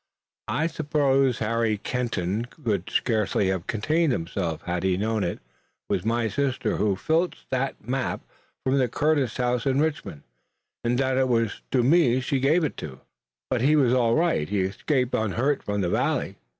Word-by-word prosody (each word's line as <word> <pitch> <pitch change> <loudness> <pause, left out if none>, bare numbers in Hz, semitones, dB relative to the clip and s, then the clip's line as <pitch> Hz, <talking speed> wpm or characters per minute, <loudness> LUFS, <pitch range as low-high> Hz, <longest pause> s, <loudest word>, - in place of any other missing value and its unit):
I 160 - 0
suppose 140 -5 +1
Harry 115 -1 0
Kenton 115 -3 -2
could 110 - -3
scarcely 105 -3 +1
have 95 -2 -2
contained 155 +8 +1
himself 85 -4 -3
had 90 0 -2
he 95 -1 +1
known 110 +1 0
it 85 - -2 0.5
was 90 - 0
my 115 +1 +1
sister 130 +5 -1
who 105 -2 +1
filched 165 - -1
that 130 0 -2
map 130 0 -2 0.4
from 135 +1 +2
the 130 - +3
Curtis 145 -1 0
house 125 0 0
in 135 0 +2
Richmond 150 - -2 0.6
and 120 +1 +1
that 130 0 +1
it 130 - +3
was 115 -3 0
to 125 -2 +2
me 130 -3 +4
she 130 +1 -1
gave 155 +6 +3
it." 155 - -3 0.7
"But 125 -3 +1
he 145 +4 +4
was 130 -5 +4
all 120 -2 +3
right? 160 - +1
He 100 -1 +1
escaped 125 +7 -1
unhurt 120 +6 0
from 105 0 -2
the 90 - 0
Valley?" - - 0
125 Hz, 165 wpm, -25 LUFS, 105-135 Hz, 0.7 s, me